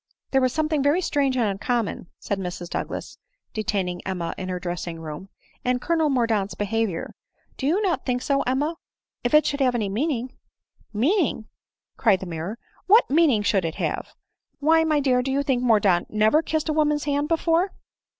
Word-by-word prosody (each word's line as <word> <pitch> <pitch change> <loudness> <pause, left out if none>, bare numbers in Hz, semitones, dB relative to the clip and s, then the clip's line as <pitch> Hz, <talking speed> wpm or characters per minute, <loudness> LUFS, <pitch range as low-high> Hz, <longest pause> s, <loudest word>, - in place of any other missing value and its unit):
" - - -53
There 270 - +3
was 255 -1 +2
something 310 0 0
very 290 +5 +3
strange 280 -7 0
and 240 - +2
uncommon," 205 0 -2
said 200 - -3
Mrs 175 -2 -5
Douglas, - - -5 0.3
detaining 190 -4 -2
Emma 180 -3 -3
in 185 -1 -5
her 180 -1 -2
dressing 175 -2 -4
room, 160 +4 -8 0.2
" - - -35
in 250 0 +1
Colonel 320 +3 +1
Mordaunt's 225 -7 0
behavior 205 -4 -2 0.2
— - - -38
Do 270 - -1
you 340 +7 +2
not 370 -4 0
think 250 -1 -1
so, 275 -1 +1
Emma? 290 +6 0 0.2
— - - -64
If 245 +5 +2
it 305 - +6
should 285 - -1
have 250 -2 +3
any 215 -4 -1
meaning 250 +3 -2 0.2
!" - - -65
" - - -34
Meaning 330 - +1 0.3
!" - - -61
cried 205 -5 +3
the 190 - -6
Major; 170 +5 -5 0.2
" - - -33
what 425 - +5
meaning 285 -9 +4
should 195 -2 +2
it 165 -1 -3
have? - - -3 0.4
Why, 320 +2 +4
my 305 -2 +2
dear, 255 -2 +3
do 265 +2 -2
you 280 +1 +1
think 265 -3 +1
Mordaunt 205 -7 +3
never 215 +8 +3
kissed 315 -1 -2
a - - +2
woman's 300 -1 +1
hand 285 0 0
before 330 +3 +2
250 Hz, 205 wpm, -24 LUFS, 195-300 Hz, 0.4 s, it